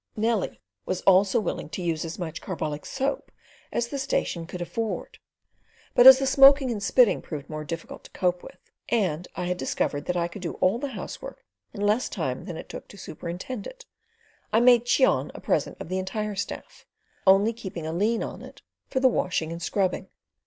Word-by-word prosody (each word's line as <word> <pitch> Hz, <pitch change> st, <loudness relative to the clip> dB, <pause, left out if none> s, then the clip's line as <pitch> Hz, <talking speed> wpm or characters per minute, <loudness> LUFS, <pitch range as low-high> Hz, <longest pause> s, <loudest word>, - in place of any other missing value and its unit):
Nellie 220 Hz, -1 st, 0 dB, 0.2 s
was 185 Hz, -1 st, -3 dB
also 195 Hz, +3 st, +4 dB
willing 185 Hz, -6 st, -4 dB
to 155 Hz, -, -5 dB
use 165 Hz, -2 st, -1 dB
as 165 Hz, 0 st, -6 dB
much 170 Hz, -3 st, -5 dB
carbolic 155 Hz, -5 st, -4 dB
soap 275 Hz, +1 st, -2 dB, 0.4 s
as 235 Hz, 0 st, -1 dB
the 280 Hz, -, -4 dB
station 175 Hz, -10 st, -1 dB
could 180 Hz, -, -7 dB
afford; 220 Hz, +5 st, -4 dB, 0.7 s
but 245 Hz, -, +7 dB
as 265 Hz, 0 st, +12 dB
the 270 Hz, -, -1 dB
smoking 270 Hz, -1 st, +6 dB
and 215 Hz, -3 st, -3 dB
spitting 240 Hz, +2 st, +4 dB
proved 150 Hz, -4 st, -7 dB
more 155 Hz, 0 st, -4 dB
difficult 165 Hz, +2 st, -7 dB
to -, -, -12 dB
cope 180 Hz, -1 st, 0 dB
with, -, -, -15 dB, 0.2 s
and 180 Hz, -7 st, 0 dB
I -, -, -3 dB
had 180 Hz, 0 st, -1 dB
discovered 145 Hz, -4 st, -2 dB
that 180 Hz, -, -1 dB
I 170 Hz, 0 st, +1 dB
could 190 Hz, +3 st, -10 dB
do 170 Hz, -, -3 dB
all 190 Hz, +6 st, +2 dB
the 285 Hz, -, -2 dB
"housework" -, -, -8 dB, 0.3 s
in 205 Hz, -, -8 dB
less 215 Hz, +5 st, +2 dB
time 130 Hz, -, -3 dB
than 170 Hz, -, -6 dB
it -, -, -8 dB
took -, -, -9 dB
to 200 Hz, -, -14 dB
superintend 185 Hz, +7 st, -6 dB
it, -, -, -12 dB, 0.7 s
I 225 Hz, -, +4 dB
made 240 Hz, -1 st, +6 dB
Cheon 260 Hz, +2 st, +3 dB
a -, -, -7 dB
present -, -, -1 dB
of -, -, -7 dB
the 185 Hz, +2 st, -2 dB
entire 210 Hz, +3 st, -3 dB
staff, -, -, -6 dB, 0.4 s
only 200 Hz, +4 st, +5 dB
keeping 190 Hz, -7 st, -7 dB
a 160 Hz, -, -3 dB
lien 215 Hz, +6 st, +1 dB
on -, -, -7 dB
it -, -, -13 dB, 0.3 s
for 260 Hz, -, 0 dB
the 260 Hz, -, +5 dB
washing 180 Hz, -9 st, 0 dB
and 170 Hz, 0 st, -6 dB
scrubbing. 190 Hz, +1 st, -1 dB
190 Hz, 195 wpm, -26 LUFS, 170-235 Hz, 0.7 s, as